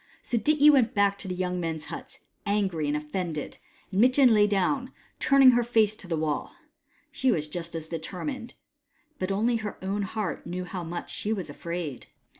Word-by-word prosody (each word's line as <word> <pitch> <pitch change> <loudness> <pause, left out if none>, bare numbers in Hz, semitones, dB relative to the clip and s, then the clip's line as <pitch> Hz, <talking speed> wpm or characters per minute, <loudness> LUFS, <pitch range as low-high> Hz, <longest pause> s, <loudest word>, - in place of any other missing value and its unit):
So - - -2
Dityi 300 +3 +6
went 255 -6 +3
back 200 -1 +3
to 195 - -8
the 180 - -3
young 180 0 -2
men's 160 -3 -3
huts, - - -8 0.3
angry 190 -7 0
and 145 +1 +1
offended, 150 0 -4 0.3
and 195 +2 +2
Mitjen 255 0 +6
lay 210 -1 +5
down, 210 +7 0 0.3
turning 275 -2 +7
her 240 0 +3
face 220 -3 +3
to 185 - -8
the 165 -2 -1
wall. 155 -1 -2 0.6
She 260 -1 +1
was 155 -8 0
just 170 +1 -4
as 160 -1 -4
determined; 185 - -5 0.6
but 185 +1 -1
only 230 +4 +2
her 215 -2 -5
owti 200 +1 -1
heart 210 -2 -4
knew 180 +1 -3
how 180 -1 -5
much 170 +1 -6
she 210 - -3
was 190 -9 -3
afraid. 170 -4 -5
195 Hz, 185 wpm, -27 LUFS, 170-230 Hz, 0.6 s, turning